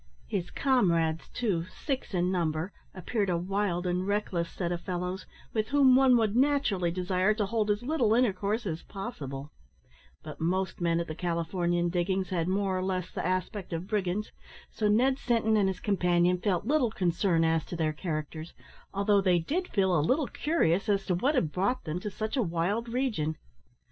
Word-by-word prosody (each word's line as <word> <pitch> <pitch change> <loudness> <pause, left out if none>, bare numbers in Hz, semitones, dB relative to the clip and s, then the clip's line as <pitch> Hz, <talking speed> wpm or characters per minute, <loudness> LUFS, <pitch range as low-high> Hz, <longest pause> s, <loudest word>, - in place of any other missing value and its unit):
His 170 - -3
comrades, 170 - +1
too, 195 -9 -1
six 265 +1 -4
in 180 +1 +1
number, 165 0 -1 0.2
appeared 200 +2 -2
a 175 - +1
wild 185 0 -1
and 180 +1 -1
reckless 200 -5 -1
set 175 -2 -3
of 175 -1 -2
fellows, 180 +1 -4 0.3
with 215 -1 0
whom 275 -3 +5
one 260 -2 +6
would 220 -2 +1
naturally 255 -10 +2
desire 185 +3 +1
to 210 -2 0
hold 215 +1 0
as 205 +2 0
little 245 -6 +2
intercourse 215 -1 +1
as 165 -3 -3
possible; 145 - -7 0.7
but 155 - -9
most 185 +3 -1
men 170 -1 +2
at 170 - -1
the 155 - -5
Californian 175 +1 -1
diggings 185 +2 0
had 170 -3 -1
more 190 0 0
or 185 - -1
less 185 -2 -2
the - - -4
aspect 185 +1 -2
of 165 +2 -3
brigands, 205 0 -1 0.4
so 215 - 0
Ned 255 +6 +3
Sinton 225 -4 +2
and 205 -2 +3
his 185 -1 -4
companion 180 -3 +2
felt 185 -1 0
little 275 -2 +2
concern 175 -3 +1
as 160 -1 +2
to - - -6
their 160 -2 0
characters, 155 0 -5 0.4
although 200 0 +2
they 185 -2 +3
did 330 - -1
feel 190 -3 +2
a 155 - +3
little 265 - +2
curious 220 - 0
as 200 -1 +1
to 185 - 0
what 265 - +1
had 165 - +1
brought 200 +9 0
them 160 +2 -3
to 210 - -4
such 215 +5 -4
a 260 - +2
wild 195 +5 -1
region. 220 - -1
190 Hz, 185 wpm, -29 LUFS, 175-215 Hz, 0.7 s, one